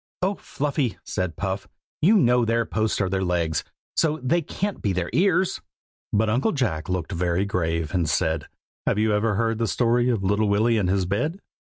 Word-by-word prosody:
"Oh! 190 +2 +2
Fluffy," 145 - -2
said 90 -3 -2
Puff, 95 +1 -3 0.3
"you 210 +7 +6
know 125 -7 +4
their 115 0 +1
posts 110 0 -1
are 100 - +2
their 95 +1 -1
legs, 85 -3 0 0.3
so 155 -1 +1
they 170 +7 +2
can't 200 +5 -3
be 100 - 0
their 90 -1 -2
ears." 185 0 +2 0.5
But 110 +2 +2
Uncle 125 - +1
Jack 105 - -1
looked 90 -1 -2
very 90 +1 0
grave, 85 -4 -1
and 85 -5 +1
said, 80 -2 0 0.4
"Have - - +2
you 110 +1 +2
never 105 0 +1
heard 115 +1 0
the 115 - +1
story 120 +2 +2
of 115 -5 0
Little 105 +2 +2
Willy 110 +3 +3
and 95 -3 0
his 95 -1 +1
bed? 150 - -1
105 Hz, 190 wpm, -24 LUFS, 90-125 Hz, 0.5 s, you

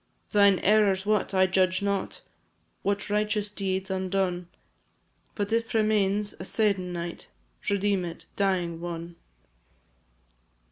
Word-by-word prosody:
Thine 200 -2 +5
errors 200 -2 +4
what, 210 -2 +1
I 190 -1 +4
judge 185 0 +2
not; 200 -1 -2 0.6
What 200 0 -1
righteous 210 0 0
deeds 190 -1 -2
undone; 185 -2 -1 0.9
But 205 +1 -2
if 230 0 0
remains 210 -2 +2
a - - -5
se'ennight, 180 -5 -1 0.4
Redeem 200 -1 +1
it, 170 -1 -7
dying 180 -4 0
one! 170 0 -6
195 Hz, 105 wpm, -27 LUFS, 185-205 Hz, 0.9 s, Thine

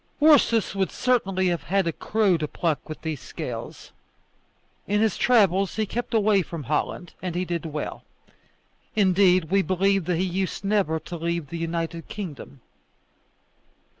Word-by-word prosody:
Ursus 290 -9 +4
would 190 -3 -1
certainly 195 -7 +1
have 170 -1 -1
had 195 0 0
a 165 - +1
crow 210 -1 +1
to 155 -2 -2
pluck 160 -1 -2
with 155 - -6
those 160 -4 -3
scales. - - -7 1.0
In 205 +1 +1
his 220 -3 +2
travels 195 -6 +3
he 220 - 0
kept 235 +3 -3
away 210 -2 +4
from 165 -3 -6
Holland, 150 +6 -2
and 180 -2 -4
he 180 +1 -1
did 170 -2 -3
well. 150 -1 -5 0.9
Indeed, 185 -4 +4
we 195 0 +4
believe 195 0 +1
that 175 -1 0
he 180 - +1
used 190 +1 -2
never 195 -6 +1
to 170 +2 -7
leave 170 -2 -2
the 170 - -3
United 165 0 -3
Kingdom. 150 -9 -8
185 Hz, 155 wpm, -25 LUFS, 165-200 Hz, 1.0 s, Ursus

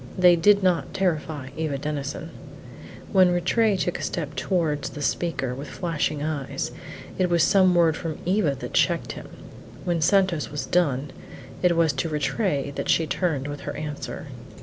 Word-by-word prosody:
They 180 -1 +7
did 200 +4 +4
not 180 -2 +1
terrify 155 -7 -1
Eva 155 -3 -2
Denison. 150 +3 -4 0.8
When 185 -3 +6
Rattray 195 +4 +2
took - - -1
a - - -6
step - - -3
towards 160 -6 0
the 145 - -8
speaker, 140 -6 -1
with 140 +3 -7
flashing 155 -4 -2
eyes, 150 -3 -3 0.5
it 185 -1 +2
was 170 -2 +3
some 185 +1 +4
word 165 -2 +4
from 165 -2 -4
Eva 180 -6 +2
that - - -7
checked - - +2
him; - - -9 0.6
when 170 -2 0
Santos 185 -2 +2
was 145 -1 -4
done, 145 -6 +1 0.5
it 175 -2 +3
was 165 -3 +3
to 135 +5 -2
Rattray 150 -1 -1
that - - -4
she 165 - +3
turned 155 -5 -1
with 145 0 -5
her - - -6
answer. 150 -1 -5
165 Hz, 165 wpm, -25 LUFS, 145-180 Hz, 0.8 s, They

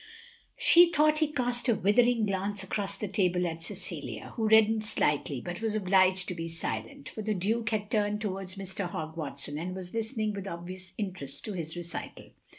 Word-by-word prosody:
" - - -29
She 345 0 +7
thought 305 -1 +4
he 310 - +3
cast 245 -2 0
a 235 - +5
withering 230 +4 +4
glance 195 0 -2
across 195 +1 -2
the 210 - -3
table 180 -2 +1
at 165 -1 -3
Cecilia, 165 - -6
who 225 -2 +1
reddened 220 0 +6
slightly, 145 - 0
but 175 +2 -5
was 220 -1 0
obliged 185 -2 +3
to - - -2
be 165 -1 -4
silent; 115 -7 -4
for 220 - -6
the 215 0 -1
Duke 215 +4 0
had 210 -1 -2
turned 210 -1 +1
towards 195 -2 -4
Mr. 195 -1 -3
Hogg 160 -1 -5
Watson 145 -1 -5
and 180 +3 -4
was 180 -1 -7
listening 220 -1 -1
with 200 -1 -5
obvious 180 +1 -7
interest 180 -10 -5
to 215 - -3
his 165 -3 -4
recital. 170 -1 -6
195 Hz, 190 wpm, -30 LUFS, 175-220 Hz, -, She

